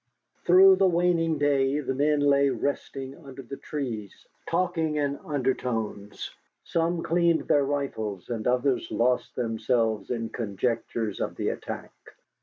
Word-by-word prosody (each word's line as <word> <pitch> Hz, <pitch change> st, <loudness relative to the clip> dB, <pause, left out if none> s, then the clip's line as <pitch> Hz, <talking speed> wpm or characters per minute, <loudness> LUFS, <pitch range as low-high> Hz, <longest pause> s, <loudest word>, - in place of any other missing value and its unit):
Through 190 Hz, +2 st, +8 dB
the 195 Hz, -, +4 dB
waning 170 Hz, -2 st, +2 dB
day 140 Hz, -1 st, +2 dB
the 135 Hz, -2 st, -2 dB
men 145 Hz, +2 st, +2 dB
lay 140 Hz, -1 st, +4 dB
resting 135 Hz, +2 st, -4 dB
under 135 Hz, -1 st, -10 dB
the 135 Hz, +3 st, -7 dB
trees, 115 Hz, -9 st, -5 dB, 0.2 s
talking 165 Hz, -3 st, 0 dB
in 145 Hz, -1 st, 0 dB
undertones. 120 Hz, -7 st, -2 dB, 0.3 s
Some 165 Hz, 0 st, 0 dB
cleaned 170 Hz, -1 st, +2 dB
their 145 Hz, -, +4 dB
rifles, 110 Hz, -9 st, -3 dB
and 115 Hz, -2 st, -3 dB
others 125 Hz, 0 st, +1 dB
lost 125 Hz, +1 st, 0 dB
themselves 115 Hz, -3 st, 0 dB
in 115 Hz, -2 st, -2 dB
conjectures 115 Hz, 0 st, -2 dB
of -, -, -2 dB
the -, -, -1 dB
attack. -, -, -6 dB
140 Hz, 130 wpm, -27 LUFS, 115-155 Hz, 0.3 s, Through